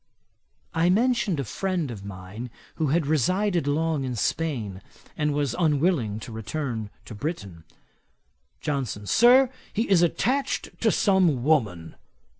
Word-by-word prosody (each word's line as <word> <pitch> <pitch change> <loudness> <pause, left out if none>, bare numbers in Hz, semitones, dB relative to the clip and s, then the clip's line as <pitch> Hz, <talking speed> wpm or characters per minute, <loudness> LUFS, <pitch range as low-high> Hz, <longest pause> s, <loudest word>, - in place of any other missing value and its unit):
I 165 +1 +2
mentioned 220 - +2
a - - 0
friend 175 - -2
of 100 -4 -8
mine 100 +4 -8 0.3
who 160 - +1
had 155 +3 +1
resided 175 - +1
long 155 0 0
in 125 -2 -3
Spain, 115 - -2 0.3
and 150 -1 0
was 145 -4 -1
unwilling 150 - +1
to 120 - -8
return 110 0 -4 0.2
to - - -9
Britain. 100 - -5 1.0
JOHNSON. 130 -8 -3
'Sir, 245 - +5 0.2
he 225 +3 -1
is 190 -3 +4
attached 255 - 0
to - - +4
some 180 - +3
woman.' 105 - +1
150 Hz, 130 wpm, -25 LUFS, 110-175 Hz, 1.0 s, Sir